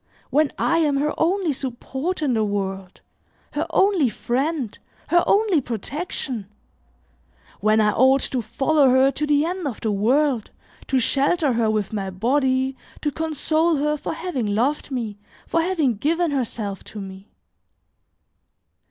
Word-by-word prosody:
When 295 Hz, +2 st, +3 dB
I 335 Hz, -, +2 dB
am 295 Hz, -4 st, +2 dB
her 300 Hz, +2 st, 0 dB
only 350 Hz, -1 st, +1 dB
support 270 Hz, +6 st, -4 dB
in 270 Hz, -4 st, +1 dB
the 220 Hz, -2 st, +2 dB
world, 195 Hz, -2 st, -3 dB, 0.5 s
her -, -, -1 dB
only 380 Hz, -9 st, +3 dB
friend, 265 Hz, +1 st, -2 dB, 0.3 s
her 345 Hz, 0 st, +4 dB
only 400 Hz, -7 st, +3 dB
protection! 245 Hz, -, -4 dB, 1.1 s
When 215 Hz, +1 st, +3 dB
I 210 Hz, -1 st, +4 dB
ought 265 Hz, +4 st, +4 dB
to 255 Hz, -, -2 dB
follow 270 Hz, +6 st, +2 dB
her 260 Hz, +2 st, +5 dB
to 300 Hz, +2 st, -2 dB
the 295 Hz, +1 st, +3 dB
end 360 Hz, -1 st, -3 dB
of 245 Hz, -, -5 dB
the 220 Hz, -, 0 dB
world, 245 Hz, +4 st, +1 dB, 0.4 s
to 265 Hz, -, +1 dB
shelter 280 Hz, +4 st, +2 dB
her 230 Hz, -1 st, +1 dB
with 215 Hz, -1 st, -1 dB
my 195 Hz, -2 st, -2 dB
body, 260 Hz, +6 st, +1 dB, 0.3 s
to 295 Hz, -, 0 dB
console 320 Hz, +2 st, 0 dB
her 300 Hz, +1 st, +1 dB
for 300 Hz, -, -4 dB
having 315 Hz, -10 st, -3 dB
loved 275 Hz, +8 st, 0 dB
me, 225 Hz, -6 st, -4 dB, 0.3 s
for 330 Hz, -, +1 dB
having 320 Hz, -, +1 dB
given 330 Hz, -, +1 dB
herself 225 Hz, -7 st, -3 dB
to 215 Hz, -, -9 dB
me!" 190 Hz, 0 st, -9 dB
270 Hz, 145 wpm, -23 LUFS, 225-310 Hz, 1.1 s, her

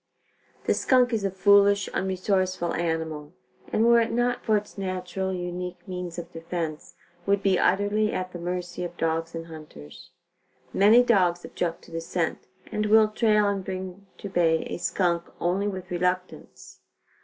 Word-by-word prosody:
The -, -, +3 dB
skunk 250 Hz, -2 st, +3 dB
is 215 Hz, -3 st, 0 dB
a 195 Hz, -, +1 dB
foolish, 200 Hz, +1 st, +4 dB
unresourceful 185 Hz, -2 st, 0 dB
animal 160 Hz, -2 st, -3 dB, 0.4 s
and 220 Hz, -, +2 dB
were 235 Hz, 0 st, +6 dB
it 230 Hz, -, -1 dB
not 245 Hz, +1 st, 0 dB
for 215 Hz, -2 st, +3 dB
its 205 Hz, 0 st, -7 dB
natural, 190 Hz, 0 st, -3 dB
unique 180 Hz, 0 st, -5 dB
means 180 Hz, -2 st, -5 dB
of 175 Hz, -, -7 dB
defense, 165 Hz, -2 st, -5 dB, 0.3 s
would 200 Hz, 0 st, +2 dB
be 190 Hz, -2 st, +3 dB
utterly 205 Hz, +3 st, +2 dB
at 185 Hz, 0 st, -3 dB
the 175 Hz, -, -6 dB
mercy 180 Hz, 0 st, -4 dB
of 175 Hz, 0 st, -6 dB
dogs 165 Hz, +1 st, -1 dB
and 165 Hz, 0 st, -5 dB
hunters. 150 Hz, -, -12 dB, 0.6 s
Many 220 Hz, +5 st, +6 dB
dogs 180 Hz, -7 st, +2 dB
object 170 Hz, -2 st, -3 dB
to -, -, -16 dB
the 165 Hz, 0 st, -4 dB
scent 165 Hz, 0 st, -3 dB, 0.2 s
and 210 Hz, 0 st, -1 dB
will 215 Hz, 0 st, +5 dB
trail 215 Hz, -1 st, +3 dB
and 200 Hz, -1 st, -1 dB
bring 190 Hz, +1 st, -6 dB
to -, -, -7 dB
bay 165 Hz, -4 st, +2 dB
a -, -, -3 dB
skunk 175 Hz, 0 st, 0 dB
only 185 Hz, +4 st, 0 dB
with 190 Hz, -3 st, -5 dB
reluctance. 180 Hz, +1 st, -3 dB
185 Hz, 160 wpm, -26 LUFS, 170-200 Hz, 0.6 s, were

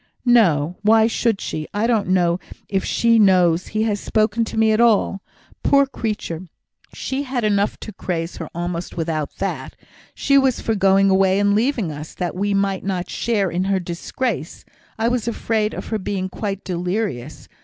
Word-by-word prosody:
"No! 180 Hz, -10 st, +3 dB
Why 220 Hz, +1 st, +5 dB
should 225 Hz, -2 st, 0 dB
she? 155 Hz, -1 st, -4 dB
I 210 Hz, +2 st, +1 dB
don't 225 Hz, -4 st, +1 dB
know 175 Hz, -1 st, +2 dB, 0.3 s
if 195 Hz, -1 st, -1 dB
she 230 Hz, -1 st, +3 dB
knows 180 Hz, -4 st, +4 dB
he 215 Hz, 0 st, -1 dB
has 210 Hz, -2 st, 0 dB
spoken 215 Hz, +2 st, +1 dB
to 220 Hz, -, -6 dB
me 220 Hz, 0 st, +4 dB
at 215 Hz, +2 st, +3 dB
all. 215 Hz, -4 st, +3 dB, 0.4 s
Poor 280 Hz, 0 st, +4 dB
creature! 210 Hz, -9 st, -4 dB, 0.4 s
she 265 Hz, +1 st, -3 dB
had 260 Hz, -3 st, -3 dB
enough 205 Hz, -1 st, +1 dB
to 215 Hz, -, -7 dB
craze 170 Hz, -2 st, -4 dB
her 165 Hz, -, -6 dB
almost 175 Hz, 0 st, -4 dB
without 160 Hz, -3 st, -2 dB
that! -, -, -4 dB, 0.4 s
She 275 Hz, -1 st, +3 dB
was 265 Hz, -2 st, +1 dB
for 225 Hz, -, -1 dB
going 195 Hz, -1 st, +4 dB
away 190 Hz, 0 st, +3 dB
and 205 Hz, 0 st, +3 dB
leaving 225 Hz, -, +1 dB
us, 150 Hz, +1 st, -8 dB
that 180 Hz, -1 st, -3 dB
we 200 Hz, +2 st, -1 dB
might 195 Hz, -1 st, 0 dB
not 185 Hz, -2 st, -3 dB
share 205 Hz, -6 st, 0 dB
in 180 Hz, +2 st, -1 dB
her 195 Hz, 0 st, +1 dB
disgrace. 175 Hz, -, -4 dB, 0.3 s
I 225 Hz, +1 st, +1 dB
was 240 Hz, -1 st, -1 dB
afraid 220 Hz, -2 st, -1 dB
of -, -, -7 dB
her 220 Hz, -, -1 dB
being 190 Hz, -1 st, -3 dB
quite 200 Hz, 0 st, -4 dB
delirious. 180 Hz, -, -3 dB
200 Hz, 175 wpm, -21 LUFS, 180-225 Hz, 0.4 s, Why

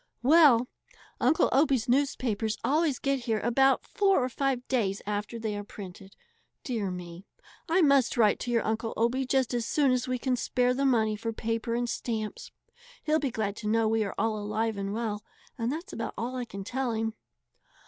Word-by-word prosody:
"Well, 275 Hz, -4 st, +6 dB, 0.5 s
Uncle 265 Hz, +6 st, +3 dB
Obie's 270 Hz, -4 st, +2 dB
newspapers 240 Hz, -5 st, 0 dB
always 305 Hz, -2 st, +2 dB
get 275 Hz, -3 st, -1 dB
here 220 Hz, -2 st, 0 dB
about 270 Hz, +3 st, +3 dB
four 390 Hz, -9 st, +2 dB
or 255 Hz, -, -1 dB
five 260 Hz, -1 st, -1 dB
days 205 Hz, -7 st, 0 dB
after 210 Hz, +3 st, -3 dB
they 220 Hz, -2 st, -3 dB
are 205 Hz, -, -4 dB
printed. 195 Hz, -1 st, -11 dB, 0.5 s
Dear 225 Hz, -8 st, -2 dB
me! 180 Hz, 0 st, -8 dB, 0.4 s
I 345 Hz, +2 st, +4 dB
must 275 Hz, -4 st, +3 dB
write 215 Hz, -3 st, +4 dB
to 245 Hz, -, -5 dB
your 235 Hz, -1 st, +1 dB
Uncle 225 Hz, +1 st, -2 dB
Obie 250 Hz, +3 st, +1 dB
just 260 Hz, -2 st, +1 dB
as 235 Hz, -2 st, -1 dB
soon 285 Hz, -3 st, +2 dB
as 255 Hz, 0 st, 0 dB
we 255 Hz, 0 st, -1 dB
can 255 Hz, +1 st, 0 dB
spare 250 Hz, 0 st, +1 dB
the 275 Hz, +2 st, 0 dB
money 220 Hz, -5 st, +2 dB
for 225 Hz, +2 st, -4 dB
paper 230 Hz, +1 st, -2 dB
and 240 Hz, 0 st, -1 dB
stamps. 220 Hz, -3 st, -4 dB, 0.5 s
He'll 310 Hz, +1 st, +2 dB
be 280 Hz, -, -1 dB
glad 215 Hz, -3 st, -2 dB
to 210 Hz, -, -5 dB
know 225 Hz, +1 st, +2 dB
we 220 Hz, 0 st, +2 dB
are 200 Hz, -, -5 dB
all 215 Hz, 0 st, 0 dB
alive 215 Hz, +2 st, -1 dB
and 200 Hz, 0 st, -3 dB
well, 210 Hz, -1 st, -3 dB, 0.3 s
and 230 Hz, +1 st, -2 dB
that's 335 Hz, +7 st, -6 dB
about -, -, -4 dB
all 245 Hz, +2 st, -3 dB
I 250 Hz, -1 st, -3 dB
can 200 Hz, -4 st, -7 dB
tell 250 Hz, +3 st, -2 dB
him." 225 Hz, 0 st, -2 dB
235 Hz, 190 wpm, -28 LUFS, 215-260 Hz, 0.5 s, Well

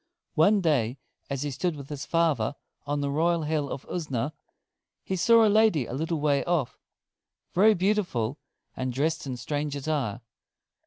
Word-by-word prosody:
One 200 Hz, +6 st, +4 dB
day 135 Hz, -7 st, +1 dB, 0.3 s
as 140 Hz, 0 st, -2 dB
he 145 Hz, -, -2 dB
stood 170 Hz, +5 st, -1 dB
with 140 Hz, -2 st, -9 dB
his 145 Hz, -2 st, -6 dB
father 165 Hz, -4 st, +1 dB, 0.3 s
on 145 Hz, 0 st, -1 dB
the 140 Hz, 0 st, -1 dB
royal 165 Hz, +3 st, +1 dB
Hill 150 Hz, -2 st, -1 dB
of 135 Hz, -, -5 dB
Usna, 150 Hz, -4 st, -2 dB, 0.7 s
he 190 Hz, -, -2 dB
saw 230 Hz, +5 st, +5 dB
a -, -, +5 dB
lady 215 Hz, -, +4 dB
a -, -, -7 dB
little 160 Hz, +4 st, -1 dB
way 145 Hz, -2 st, +2 dB
off, 160 Hz, -8 st, -1 dB, 0.7 s
very 210 Hz, +4 st, +5 dB
beautiful, 175 Hz, -, 0 dB, 0.4 s
and 130 Hz, 0 st, -2 dB
dressed 150 Hz, +4 st, -1 dB
in 130 Hz, -2 st, -4 dB
strange 145 Hz, +2 st, -3 dB
attire. 135 Hz, -6 st, -2 dB
150 Hz, 160 wpm, -27 LUFS, 140-175 Hz, 0.7 s, saw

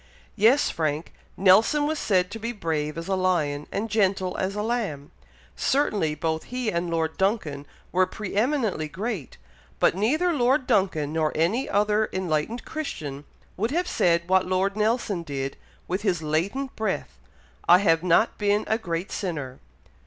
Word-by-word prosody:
'" -, -, -28 dB
"Yes, 230 Hz, +7 st, +4 dB
Frank! 155 Hz, -1 st, -2 dB, 0.2 s
Nelson 215 Hz, +10 st, +5 dB
was 310 Hz, 0 st, -1 dB
said 185 Hz, -2 st, +1 dB
to 225 Hz, -, -6 dB
be 230 Hz, +2 st, -3 dB
'brave 160 Hz, -7 st, -2 dB
as 165 Hz, +1 st, -5 dB
a 195 Hz, -, 0 dB
lion, 160 Hz, -6 st, 0 dB
and 215 Hz, +3 st, -2 dB
gentle 195 Hz, -4 st, +1 dB
as 190 Hz, +1 st, -2 dB
a 210 Hz, -, -2 dB
lamb.' 210 Hz, -, -2 dB, 0.4 s
Certainly 200 Hz, -, +1 dB
both 160 Hz, 0 st, -2 dB
he 250 Hz, -3 st, -2 dB
and 170 Hz, 0 st, -1 dB
Lord 160 Hz, -1 st, -1 dB
Duncan 165 Hz, -8 st, -1 dB, 0.2 s
were 185 Hz, +1 st, +3 dB
pre 210 Hz, -2 st, -6 dB
eminently 220 Hz, -, +1 dB
great; 190 Hz, -, -5 dB, 0.4 s
but -, -, +4 dB
neither 305 Hz, -, +2 dB
Lord 260 Hz, 0 st, +2 dB
Duncan, 185 Hz, -, +1 dB
nor 155 Hz, -1 st, +1 dB
any 185 Hz, -, +1 dB
other 210 Hz, +1 st, +2 dB
enlightened 185 Hz, +5 st, -2 dB
Christian, 150 Hz, -, -5 dB, 0.3 s
would 220 Hz, +5 st, -1 dB
have 350 Hz, +6 st, 0 dB
said 170 Hz, -, +2 dB
what 190 Hz, 0 st, +3 dB
Lord 190 Hz, +2 st, +1 dB
Nelson 215 Hz, -3 st, 0 dB
did, 135 Hz, -4 st, -4 dB, 0.3 s
with 185 Hz, +3 st, -2 dB
his 180 Hz, -6 st, 0 dB
latent 195 Hz, -, -1 dB
breath 205 Hz, -, -3 dB, 0.5 s
'I 175 Hz, -, +9 dB
have 165 Hz, -4 st, +3 dB
not 180 Hz, +5 st, +2 dB
been 205 Hz, 0 st, +2 dB
a 220 Hz, -, 0 dB
great 175 Hz, -3 st, -4 dB
sinner!' 145 Hz, -9 st, -4 dB
190 Hz, 160 wpm, -25 LUFS, 160-220 Hz, 0.5 s, I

